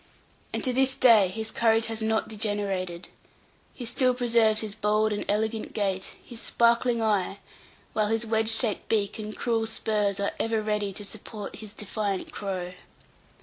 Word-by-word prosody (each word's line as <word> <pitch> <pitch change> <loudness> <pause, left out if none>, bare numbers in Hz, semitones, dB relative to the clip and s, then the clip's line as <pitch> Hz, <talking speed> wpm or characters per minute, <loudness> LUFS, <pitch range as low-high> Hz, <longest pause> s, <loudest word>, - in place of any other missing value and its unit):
And - - -3
to 255 - 0
this 265 +1 +2
day 225 -6 +6
his 220 +4 -3
courage 225 -1 +3
has 225 0 -3
not 220 0 +1
degenerated. 200 -5 -2 0.7
He 245 - -6
still 250 +2 +2
preserves 230 -3 +3
his 215 -2 -4
bold 210 0 +1
and 205 - -2
elegant 220 +2 -1
gait, 195 -3 -1
his 235 -2 -8
sparkling 235 0 +2
eye, 200 -3 +1 0.6
while 215 -1 +1
his 225 +2 0
wedge 220 0 +1
shaped 225 -2 +2
beak 210 -1 0
and 215 0 -6
cruel 225 -2 0
spurs 210 -3 0
are 200 - 0
ever 225 -1 0
ready 210 -1 -1
to 205 +2 -6
support 210 0 -8
his 215 -2 -7
defiant 205 -2 -3
crow. 185 -3 -4
215 Hz, 160 wpm, -27 LUFS, 205-225 Hz, 0.7 s, day